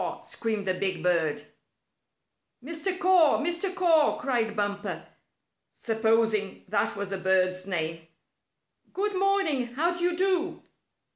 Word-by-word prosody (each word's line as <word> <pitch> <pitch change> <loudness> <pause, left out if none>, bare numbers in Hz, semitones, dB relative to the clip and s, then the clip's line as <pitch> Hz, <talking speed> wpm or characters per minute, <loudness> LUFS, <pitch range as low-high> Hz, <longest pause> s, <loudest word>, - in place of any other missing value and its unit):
screamed 220 -3 -3
the 185 - +1
big 190 -2 -2
bird. 170 -4 +1 1.2
"Mr. 335 +5 -2
Caw! 370 -5 +4
Mr. 340 +4 0
Caw!" 330 -5 +3
cried 230 -5 -1
Bumper, 205 -1 -3 0.7
supposing 220 -2 0
that 200 0 0
was 200 -1 -5
the 195 - -2
bird's 185 0 +1
name. 165 -3 -3 0.9
"Good 410 +2 -1
morning! 370 -11 +1
How 340 +5 +1
do 345 - -4
you 350 -1 +1
do?" 365 -2 0
230 Hz, 120 wpm, -27 LUFS, -, 1.2 s, Caw